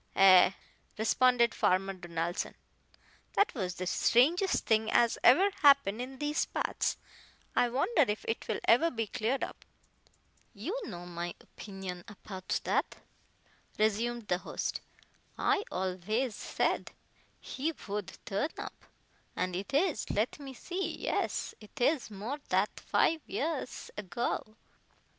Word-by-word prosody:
"Ay," 190 Hz, 0 st, +7 dB, 0.4 s
responded 235 Hz, +1 st, +3 dB
Farmer 195 Hz, +1 st, +2 dB
Donaldson, 175 Hz, -1 st, -3 dB, 0.8 s
"that 405 Hz, -, +3 dB
was 185 Hz, -7 st, -3 dB
the 185 Hz, -, -4 dB
strangest 320 Hz, -, +3 dB
thing 220 Hz, -1 st, +2 dB
as 235 Hz, -1 st, +3 dB
ever 375 Hz, +11 st, +6 dB
happened 280 Hz, -7 st, +5 dB
in 265 Hz, +1 st, -6 dB
these 295 Hz, +2 st, 0 dB
parts. -, -, -1 dB, 0.6 s
I 245 Hz, -, +4 dB
wonder 285 Hz, -, +3 dB
if 210 Hz, 0 st, -2 dB
it 225 Hz, -, -2 dB
will -, -, -1 dB
ever 250 Hz, +9 st, +5 dB
be 225 Hz, -6 st, -2 dB
cleared 225 Hz, +6 st, -1 dB
up." -, -, -6 dB, 0.9 s
"You 285 Hz, -, -4 dB
know 175 Hz, -, -7 dB
my 175 Hz, 0 st, -5 dB
opinion 190 Hz, -3 st, -8 dB
apout 195 Hz, -2 st, -5 dB
that," -, -, 0 dB, 0.8 s
resumed 220 Hz, +2 st, 0 dB
the 180 Hz, -, +1 dB
host, -, -, -3 dB, 0.6 s
"I 415 Hz, -, +2 dB
alvays 190 Hz, +7 st, -1 dB
said -, -, -1 dB, 0.5 s
he 285 Hz, +5 st, -3 dB
vould 205 Hz, -, -6 dB
turn 205 Hz, +10 st, -1 dB
up. -, -, -8 dB, 0.5 s
But 180 Hz, -1 st, -1 dB
it 195 Hz, +9 st, -4 dB
is 295 Hz, -, +1 dB
let 215 Hz, +8 st, 0 dB
me 270 Hz, -2 st, -8 dB
see 350 Hz, +3 st, -3 dB
yes, -, -, -1 dB
it 210 Hz, -, -13 dB
is 265 Hz, 0 st, +2 dB
more 220 Hz, +8 st, -5 dB
that 190 Hz, +3 st, +1 dB
fife 320 Hz, -1 st, +2 dB
years 295 Hz, -3 st, -3 dB
ago. 210 Hz, +3 st, -2 dB
220 Hz, 130 wpm, -31 LUFS, 190-275 Hz, 0.9 s, Ay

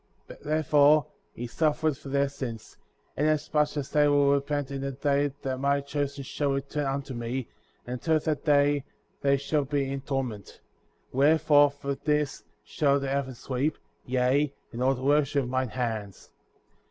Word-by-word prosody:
Wherefore, 150 Hz, 0 st, +4 dB, 0.3 s
he 120 Hz, -, -6 dB
suffereth 155 Hz, +2 st, 0 dB
for 135 Hz, -, -9 dB
their 140 Hz, +1 st, +2 dB
sins;^ 125 Hz, -6 st, -7 dB, 0.4 s
inasmuch 150 Hz, 0 st, +1 dB
as 140 Hz, -2 st, -4 dB
they 150 Hz, -1 st, +4 dB
will 145 Hz, -1 st, +4 dB
repent 140 Hz, 0 st, -1 dB
in 135 Hz, -1 st, -4 dB
the 135 Hz, 0 st, -3 dB
day 140 Hz, +1 st, +1 dB
that 130 Hz, -1 st, -2 dB
my 140 Hz, +1 st, +2 dB
Chosen* 140 Hz, 0 st, -3 dB
shall 140 Hz, +1 st, -1 dB
return 140 Hz, +1 st, -2 dB
unto 135 Hz, 0 st, -3 dB
me, 120 Hz, +1 st, -4 dB, 0.4 s
and 125 Hz, -, -5 dB
until 160 Hz, +6 st, +1 dB
that 155 Hz, -1 st, -2 dB
day 145 Hz, -2 st, +3 dB, 0.4 s
they 140 Hz, 0 st, +3 dB
shall 145 Hz, +2 st, 0 dB
be 140 Hz, -1 st, -1 dB
in 135 Hz, 0 st, -3 dB
torment; 130 Hz, -7 st, -4 dB, 0.5 s
40. -, -, -8 dB
Wherefore, 145 Hz, 0 st, +5 dB
for 140 Hz, 0 st, -4 dB
this 150 Hz, 0 st, -1 dB, 0.2 s
shall 140 Hz, -2 st, +1 dB
the 135 Hz, -1 st, -3 dB
heavens 135 Hz, -3 st, -3 dB
weep,' 140 Hz, +4 st, 0 dB, 0.3 s
yea, 130 Hz, +3 st, +1 dB, 0.2 s
and 120 Hz, -, -6 dB
all 135 Hz, +1 st, +3 dB
the 130 Hz, -, -8 dB
workmanship 145 Hz, 0 st, +2 dB
of 125 Hz, -, -5 dB
mine 130 Hz, -1 st, 0 dB
hands. 110 Hz, -5 st, -4 dB
140 Hz, 165 wpm, -27 LUFS, 130-145 Hz, 0.5 s, Wherefore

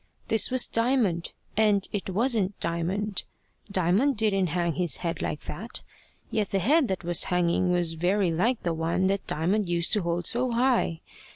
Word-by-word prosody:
This 220 Hz, -, +4 dB
was 255 Hz, -1 st, +3 dB
Diamond 230 Hz, -8 st, 0 dB, 0.2 s
and 210 Hz, -2 st, +2 dB
it 200 Hz, -2 st, -3 dB
wasn't 210 Hz, -1 st, +1 dB
Diamond. 185 Hz, +5 st, -2 dB, 0.5 s
Diamond 200 Hz, +9 st, +2 dB
didn't 200 Hz, -4 st, +2 dB
hang 170 Hz, 0 st, -1 dB
his 175 Hz, -5 st, +1 dB
head 165 Hz, -, -2 dB
like 150 Hz, -, -3 dB
that; 215 Hz, +10 st, -6 dB, 0.5 s
yet 215 Hz, -3 st, -1 dB
the 195 Hz, -, 0 dB
head 275 Hz, -, +3 dB
that 190 Hz, -3 st, -3 dB
was 175 Hz, 0 st, +3 dB
hanging 180 Hz, 0 st, +1 dB
was 175 Hz, -2 st, +1 dB
very 180 Hz, +3 st, +1 dB
like 220 Hz, +9 st, 0 dB
the 170 Hz, -, 0 dB
one 165 Hz, +3 st, 0 dB
that 195 Hz, +1 st, -1 dB
Diamond 185 Hz, +5 st, 0 dB
used 170 Hz, -1 st, 0 dB
to 210 Hz, -, +2 dB
hold 170 Hz, 0 st, -2 dB
so 245 Hz, 0 st, 0 dB
high. 235 Hz, -9 st, +1 dB
190 Hz, 170 wpm, -26 LUFS, 170-220 Hz, 0.5 s, This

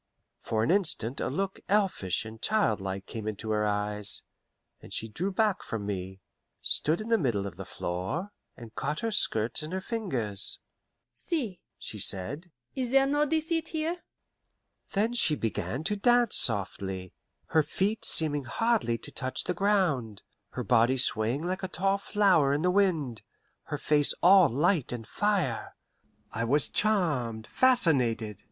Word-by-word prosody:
For 110 Hz, -1 st, -1 dB
an 115 Hz, -, +1 dB
instant 160 Hz, -, +1 dB
a -, -, -1 dB
look 190 Hz, +9 st, -3 dB
elfish 190 Hz, -, 0 dB
and 110 Hz, 0 st, -10 dB
childlike 100 Hz, -, 0 dB
came 110 Hz, -2 st, -7 dB
into 110 Hz, +1 st, -4 dB
her 105 Hz, 0 st, +1 dB
eyes, 105 Hz, 0 st, +3 dB, 0.6 s
and -, -, -14 dB
she 110 Hz, -, -3 dB
drew 175 Hz, -, -3 dB
back 210 Hz, 0 st, +1 dB
from 110 Hz, -3 st, -5 dB
me, 95 Hz, -1 st, -5 dB, 0.4 s
stood 155 Hz, +3 st, +1 dB
in 215 Hz, -, -7 dB
the 230 Hz, -, +3 dB
middle 115 Hz, -, -1 dB
of 95 Hz, -4 st, -7 dB
the 95 Hz, +1 st, -8 dB
floor, 95 Hz, -, -4 dB, 0.3 s
and 115 Hz, -2 st, -11 dB
caught 150 Hz, +2 st, -3 dB
her 230 Hz, -, -2 dB
skirts 115 Hz, -, +1 dB
in 155 Hz, +1 st, -7 dB
her 190 Hz, -, -2 dB
fingers. 135 Hz, -, -1 dB, 0.5 s
"See," 245 Hz, -, -4 dB, 0.2 s
she 105 Hz, -, -7 dB
said, 130 Hz, -, 0 dB, 0.2 s
"is 255 Hz, -2 st, -3 dB
there 270 Hz, +1 st, +4 dB
no 290 Hz, +2 st, +1 dB
deceit 320 Hz, +1 st, -1 dB
here?" 320 Hz, +2 st, -2 dB, 1.0 s
Then 215 Hz, +4 st, +1 dB
she 165 Hz, -10 st, +1 dB
began 115 Hz, +3 st, -3 dB
to 210 Hz, +5 st, 0 dB
dance 240 Hz, +2 st, +3 dB
softly, 95 Hz, -3 st, +1 dB, 0.4 s
her 160 Hz, -, +4 dB
feet 200 Hz, +8 st, -2 dB
seeming 145 Hz, -3 st, +4 dB
hardly 220 Hz, -, 0 dB
to -, -, -7 dB
touch 130 Hz, -1 st, -4 dB
the 180 Hz, -, -2 dB
ground, 170 Hz, -, 0 dB, 0.3 s
her -, -, -4 dB
body 120 Hz, +4 st, +3 dB
swaying 125 Hz, +3 st, +3 dB
like 185 Hz, +2 st, -3 dB
a 190 Hz, -, -3 dB
tall 195 Hz, +2 st, 0 dB
flower 190 Hz, -10 st, +2 dB
in 145 Hz, +3 st, -1 dB
the 180 Hz, -, +3 dB
wind, 165 Hz, -, 0 dB, 0.4 s
her 145 Hz, -, -4 dB
face 145 Hz, 0 st, +2 dB
all 185 Hz, -2 st, +7 dB
light 150 Hz, -, +1 dB
and 115 Hz, -3 st, -6 dB
fire. 195 Hz, -, -1 dB, 0.6 s
I 115 Hz, -, -3 dB
was 140 Hz, +5 st, +2 dB
charmed, 145 Hz, -, 0 dB
fascinated. 125 Hz, -, +2 dB
150 Hz, 155 wpm, -28 LUFS, -, 1.0 s, all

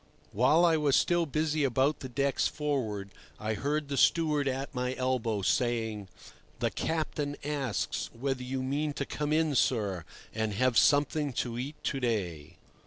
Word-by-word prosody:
While 150 Hz, -, +4 dB
I 165 Hz, -2 st, +4 dB
was 145 Hz, -3 st, +3 dB
still 175 Hz, -1 st, +2 dB
busy 155 Hz, +1 st, 0 dB
about 135 Hz, +3 st, +2 dB
the 130 Hz, -, -7 dB
decks 140 Hz, +2 st, +1 dB
forward 115 Hz, -10 st, -2 dB, 0.3 s
I 110 Hz, +1 st, -1 dB
heard 145 Hz, +6 st, -1 dB
the 140 Hz, -1 st, -3 dB
steward 150 Hz, -3 st, +3 dB
at 135 Hz, +2 st, -3 dB
my 125 Hz, 0 st, -2 dB
elbow 120 Hz, -5 st, -1 dB
saying: 110 Hz, -3 st, 0 dB, 0.5 s
"The -, -, 0 dB
captain 150 Hz, -3 st, -2 dB
asks 140 Hz, -6 st, -2 dB
whether 130 Hz, +2 st, -3 dB
you 130 Hz, +1 st, -3 dB
mean 145 Hz, +3 st, -1 dB
to 140 Hz, -, -3 dB
come 150 Hz, +2 st, -3 dB
in, 155 Hz, -1 st, +2 dB
sir, 105 Hz, -9 st, +1 dB, 0.3 s
and 110 Hz, -2 st, -1 dB
have 130 Hz, +2 st, +2 dB
something 145 Hz, +2 st, +3 dB
to 120 Hz, 0 st, -2 dB
eat 140 Hz, +4 st, -4 dB
to 135 Hz, -, -1 dB
day." 95 Hz, -, -2 dB
135 Hz, 160 wpm, -30 LUFS, 115-150 Hz, 0.5 s, While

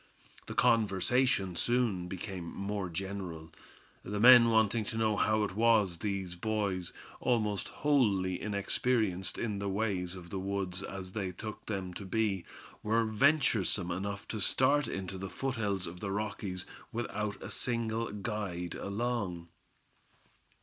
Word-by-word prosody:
The -, -, -6 dB
conversation 115 Hz, -, +3 dB
soon 115 Hz, -6 st, +1 dB
became 95 Hz, 0 st, -5 dB
more 100 Hz, +1 st, -3 dB
general, 90 Hz, -3 st, -5 dB, 0.5 s
the 105 Hz, +1 st, -3 dB
men 120 Hz, 0 st, +9 dB
wanting 110 Hz, 0 st, +3 dB
to 115 Hz, -, -4 dB
know 110 Hz, -1 st, +2 dB
how 110 Hz, +1 st, +2 dB
it 100 Hz, -, -2 dB
was 110 Hz, -6 st, +3 dB
these 95 Hz, -2 st, -2 dB
boys, 100 Hz, -2 st, -1 dB, 0.3 s
almost 110 Hz, -5 st, +1 dB
wholly 100 Hz, -11 st, +2 dB
inexperienced 100 Hz, -1 st, 0 dB
in 105 Hz, -4 st, -2 dB
the 100 Hz, 0 st, -2 dB
ways 95 Hz, -3 st, -1 dB
of 85 Hz, -2 st, -10 dB
the 95 Hz, -, -2 dB
woods 95 Hz, -1 st, -2 dB
as 95 Hz, -1 st, -6 dB
they 95 Hz, -4 st, -2 dB
took 110 Hz, +3 st, -7 dB
them 95 Hz, -4 st, -3 dB
to 100 Hz, -, -7 dB
be, 100 Hz, -2 st, 0 dB, 0.4 s
were 115 Hz, +2 st, +2 dB
venturesome 110 Hz, -, +2 dB
enough 100 Hz, +3 st, -4 dB
to 110 Hz, -, -3 dB
start 140 Hz, +6 st, +3 dB
into 95 Hz, 0 st, -4 dB
the 95 Hz, 0 st, -5 dB
foothills 105 Hz, -7 st, -2 dB
of 85 Hz, +1 st, -8 dB
the 100 Hz, -, -3 dB
Rockies 100 Hz, -3 st, -3 dB, 0.3 s
without 105 Hz, -3 st, -3 dB
a -, -, -7 dB
single 115 Hz, -2 st, -1 dB
guide 100 Hz, -5 st, -3 dB
along. 100 Hz, -5 st, -2 dB
100 Hz, 135 wpm, -32 LUFS, 95-110 Hz, 0.5 s, men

